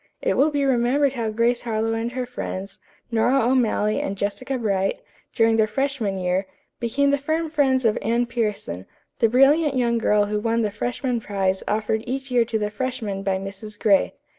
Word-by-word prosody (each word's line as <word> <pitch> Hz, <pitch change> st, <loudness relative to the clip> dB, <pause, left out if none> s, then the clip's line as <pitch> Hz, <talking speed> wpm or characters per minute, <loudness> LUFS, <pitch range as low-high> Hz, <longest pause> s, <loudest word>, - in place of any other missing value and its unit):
It -, -, 0 dB
will 290 Hz, +3 st, +4 dB
be 285 Hz, -2 st, 0 dB
remembered 265 Hz, +2 st, +2 dB
how 230 Hz, -4 st, -2 dB
Grace 235 Hz, +2 st, +1 dB
Harlowe 225 Hz, -1 st, -1 dB
and 230 Hz, +2 st, -2 dB
her 255 Hz, -1 st, -2 dB
friends, 195 Hz, -5 st, -6 dB, 0.3 s
Nora 240 Hz, +4 st, +3 dB
O'Malley 225 Hz, -3 st, +1 dB
and 195 Hz, -, -3 dB
Jessica 255 Hz, +7 st, -2 dB
Bright, 195 Hz, -4 st, 0 dB, 0.4 s
during 225 Hz, 0 st, +3 dB
their 220 Hz, -1 st, +3 dB
freshman 270 Hz, -6 st, -1 dB
year, 185 Hz, +1 st, -1 dB, 0.3 s
became 280 Hz, +4 st, +1 dB
the 285 Hz, -, +1 dB
firm 315 Hz, +3 st, -1 dB
friends 265 Hz, -5 st, +2 dB
of 220 Hz, -, +2 dB
Anne 235 Hz, +2 st, +1 dB
Pierson, 210 Hz, -, -3 dB, 0.3 s
the 230 Hz, -, +4 dB
brilliant 275 Hz, +4 st, +4 dB
young 235 Hz, -2 st, +1 dB
girl 210 Hz, -2 st, +3 dB
who 210 Hz, +1 st, -1 dB
won 230 Hz, +1 st, 0 dB
the 210 Hz, -, -1 dB
freshman 245 Hz, +3 st, -2 dB
prize 190 Hz, -2 st, -1 dB
offered 220 Hz, +1 st, 0 dB
each 270 Hz, +1 st, -4 dB
year 240 Hz, -2 st, +3 dB
to 225 Hz, -1 st, -1 dB
the 210 Hz, -1 st, -2 dB
freshmen 220 Hz, -4 st, -3 dB
by 195 Hz, -1 st, 0 dB
Mrs. 200 Hz, +2 st, -8 dB
Gray. 200 Hz, -4 st, +3 dB
230 Hz, 185 wpm, -23 LUFS, 210-260 Hz, 0.4 s, will